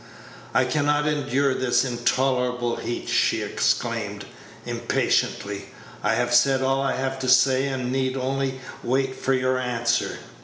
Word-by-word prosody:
"I 130 - +4
can 145 +3 0
not 145 0 +2
endure 140 -2 +1
this 130 +1 +1
intolerable 125 0 0
heat," 120 - -4
she - - +2
exclaimed, - - -1 0.4
impatiently; 100 0 -1 0.3
"I - - +1
have 120 0 0
said 135 +2 +4
all 135 +1 +1
I 135 -1 0
have 135 0 -2
to 130 -1 -2
say, 130 +1 +4
and 130 -2 -3
need 130 0 -1
only 135 0 -2 0.2
wait 130 +1 0
for 135 - 0
your 130 0 +1
answer." 120 -2 -1
130 Hz, 145 wpm, -24 LUFS, 125-135 Hz, 0.4 s, I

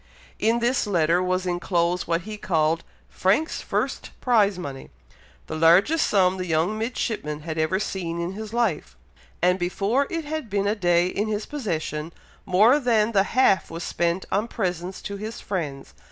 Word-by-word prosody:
In 225 +2 +2
this 240 -1 +1
letter 170 -2 +2
was 185 0 0
enclosed 175 0 0
what 165 +1 +1
he 215 +3 -7
called 165 -4 0 0.2
"Frank's 210 - 0
first - - -2
prize 210 -6 +3
money," 140 -7 -7 0.6
the - - -7
largest 175 - +4
sum 190 -2 +3
the 185 -1 -4
young 165 +6 +1
midshipman 215 -9 -3
had 160 0 -4
ever 155 +4 +1
seen 175 -5 -3
in 170 +2 -3
his 215 +1 -7
life, 190 - -1 0.5
and 180 +1 +3
before 200 +10 0
it 330 -2 -3
had 310 -5 -4
been 200 0 0
a 205 - +2
day 175 -4 +2
in 200 +4 -1
his 210 0 -2
possession, 165 - -3 0.4
more 215 +10 +5
than 230 -4 +2
the 200 -3 +4 0.2
half 195 -9 +4
was 165 +1 -6
spent 170 +2 -1
on 205 +4 +1
presents 180 -4 -3
to 200 - -5
his 215 +3 -6
friends. 145 - -4
185 Hz, 170 wpm, -24 LUFS, 170-215 Hz, 0.6 s, more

